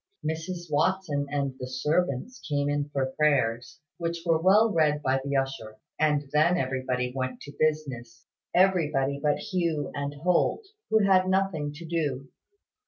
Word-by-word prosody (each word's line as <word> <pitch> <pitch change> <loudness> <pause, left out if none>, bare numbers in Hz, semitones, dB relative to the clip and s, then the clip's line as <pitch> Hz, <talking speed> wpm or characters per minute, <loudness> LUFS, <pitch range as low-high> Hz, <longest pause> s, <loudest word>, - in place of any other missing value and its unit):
Mrs 165 +3 -3
Watson 155 -2 +1
and 140 -2 -1
the 125 - -5
servants 150 - -1
came 145 -1 0
in 145 0 -1
for 135 -2 -1
prayers, 135 -2 +1 0.2
which 170 0 -3
were 165 -2 +2
well 210 +5 +5
read 150 -2 +2
by 135 0 +1
the 140 0 -2
usher; 135 -5 -2 0.2
and 150 -2 +2
then 165 +4 +4
everybody 130 -3 -1
went 130 -1 -3
to 145 0 -10
business: 145 -7 -2 0.3
everybody 150 -7 +2
but 150 -1 +2
Hugh 170 -7 -2
and 140 0 -4
Holt, 180 - +2 0.2
who 220 -1 +4
had 185 -1 +4
nothing 190 -6 0
to 165 +3 -9
do. 145 -5 -2
150 Hz, 150 wpm, -27 LUFS, 135-170 Hz, 0.3 s, well